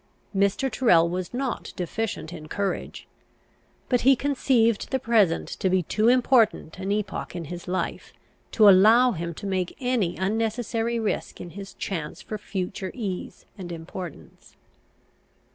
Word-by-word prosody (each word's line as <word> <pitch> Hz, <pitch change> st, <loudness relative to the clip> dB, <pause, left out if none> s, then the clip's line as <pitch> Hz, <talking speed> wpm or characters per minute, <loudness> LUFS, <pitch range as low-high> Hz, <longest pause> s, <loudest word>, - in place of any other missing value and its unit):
Mr. 200 Hz, +7 st, +2 dB
Tyrrel 200 Hz, -8 st, +4 dB
was 180 Hz, +1 st, -3 dB
not 255 Hz, -1 st, -3 dB
deficient 180 Hz, -2 st, -3 dB
in 155 Hz, -3 st, -9 dB
courage; 200 Hz, +3 st, -3 dB, 0.8 s
but 245 Hz, -2 st, +2 dB
he 270 Hz, +2 st, +6 dB
conceived 245 Hz, -5 st, +1 dB
the 265 Hz, -, +1 dB
present 220 Hz, -9 st, +2 dB
to 190 Hz, -, -2 dB
be 185 Hz, 0 st, +2 dB
too 215 Hz, +7 st, +1 dB
important 240 Hz, -8 st, +3 dB
an 195 Hz, +1 st, -2 dB
epoch 205 Hz, -3 st, -3 dB
in 170 Hz, -2 st, -4 dB
his 175 Hz, +4 st, -8 dB
life 185 Hz, +1 st, -3 dB, 0.4 s
to 215 Hz, -3 st, +5 dB
allow 220 Hz, +6 st, +7 dB
him 170 Hz, -4 st, -4 dB
to -, -, -8 dB
make 185 Hz, -2 st, -2 dB
any 245 Hz, -9 st, 0 dB
unnecessary 225 Hz, +3 st, -1 dB
risk 220 Hz, -2 st, -3 dB
in 175 Hz, -, -8 dB
his 195 Hz, +1 st, -9 dB
chance 160 Hz, -6 st, -4 dB
for 215 Hz, -, -6 dB
future 190 Hz, -1 st, -4 dB
ease 200 Hz, -7 st, -5 dB
and 175 Hz, -2 st, -6 dB
importance. 170 Hz, 0 st, -9 dB
200 Hz, 145 wpm, -25 LUFS, 180-230 Hz, 0.8 s, allow